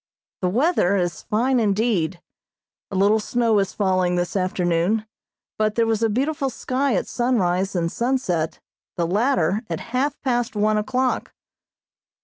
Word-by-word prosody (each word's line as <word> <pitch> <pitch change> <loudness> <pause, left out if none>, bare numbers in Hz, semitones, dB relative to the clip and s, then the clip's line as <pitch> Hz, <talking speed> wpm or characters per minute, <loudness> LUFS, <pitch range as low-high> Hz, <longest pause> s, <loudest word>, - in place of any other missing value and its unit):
The 180 - +1
weather 235 - +2
is 175 -3 -1
fine 245 +4 +1
indeed. 200 -5 +1 0.7
A - - -6
little 200 +3 +4
snow 230 -1 +1
is 195 -1 -2
falling 185 -3 +1
this 175 +1 -2
afternoon, 185 +2 0 0.5
but 215 0 +1
there 230 - +3
was 225 -1 0
a 225 - +3
beautiful 275 +5 0
sky 260 0 -1
at - - 0
sunrise 195 -6 0
and 170 -1 0
sunset, 235 -11 -1 0.4
the 170 - +1
latter 195 - +1
at - - -3
half 275 +3 0
past 245 -4 0
one 215 +1 +2
o'clock. 255 +3 -1
215 Hz, 140 wpm, -22 LUFS, 185-245 Hz, 0.7 s, little